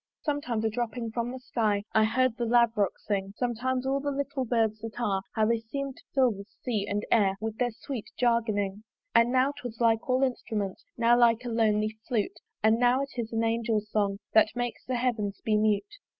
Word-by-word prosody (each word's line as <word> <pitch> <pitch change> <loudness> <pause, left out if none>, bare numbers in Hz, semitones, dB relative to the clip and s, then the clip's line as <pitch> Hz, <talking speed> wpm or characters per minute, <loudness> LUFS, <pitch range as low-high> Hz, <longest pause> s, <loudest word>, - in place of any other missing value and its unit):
Sometimes 255 -7 -1
a - - +3
dropping 235 0 -3
from 235 +1 -2
the 260 - -6
sky 215 -5 0
I 220 0 +5
heard 255 +1 +2
the 240 -1 -2
Lavrock 230 -4 +3
sing; 195 -1 -3
Sometimes 255 +1 -1
all 270 +1 +1
little 280 -1 -2
birds 220 -2 +1
that 225 +1 -7
are 200 -5 0
How 220 - +3
they 230 +1 +2
seem'd 270 +4 -5
to - - -17
fill 260 -3 +5
the 200 -1 -8 0.2
sea 215 -5 -1
and 205 +1 -1
air 200 -4 +4
With 220 +1 -4
their 245 -1 +2
sweet 240 0 -7
jargoning, 215 -4 +1 0.3
And 230 +1 +5
now 260 +2 +3
'twas 245 -4 -8
like 225 0 +2
all 255 +1 +3
instruments, 215 -6 -2
Now 235 0 +5
like 240 0 +4
a - - -2
lonely 215 -1 +1
flute; 225 -6 -1 0.2
And 220 +1 +4
now 250 +2 +3
it 275 - -7
is 235 -3 -3
an 225 0 0
angel's 225 -2 0
song 200 -2 +1 0.2
That 220 +1 +5
makes 245 -1 -3
the 255 - -2
heavens 225 -5 -1
be 215 - +2
mute. 215 - +1
230 Hz, 200 wpm, -28 LUFS, 215-250 Hz, 0.3 s, I